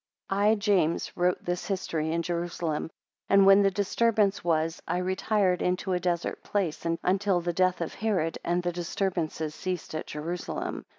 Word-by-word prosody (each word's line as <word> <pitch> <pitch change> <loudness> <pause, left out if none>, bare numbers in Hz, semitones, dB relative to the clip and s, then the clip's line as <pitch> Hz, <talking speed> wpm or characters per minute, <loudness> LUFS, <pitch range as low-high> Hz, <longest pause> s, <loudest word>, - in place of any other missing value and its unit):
(I 205 +3 +4
James 200 -6 +1
wrote 180 0 0
this 175 0 -2
History 165 -5 -2
in 170 +1 0
Jerusalem: 170 -2 -2 0.4
and 195 0 +6
when 195 +1 +8
the 200 - +4
disturbance 205 +1 +1
was 165 -1 0
I 175 - 0
retired 185 0 +1
into 185 +1 0
a 180 - +1
desert 175 -1 -2
place, 180 -5 -2 0.2
until 190 0 +2
the 175 0 -2
death 185 0 +2
of 170 - -3
Herod, 190 -7 -1
and 175 +1 0
the 175 - 0
disturbances 170 -3 -2
ceased 185 -2 -4
at 155 - -4
Jerusalem. 165 +4 -4
180 Hz, 160 wpm, -28 LUFS, 170-195 Hz, 0.4 s, when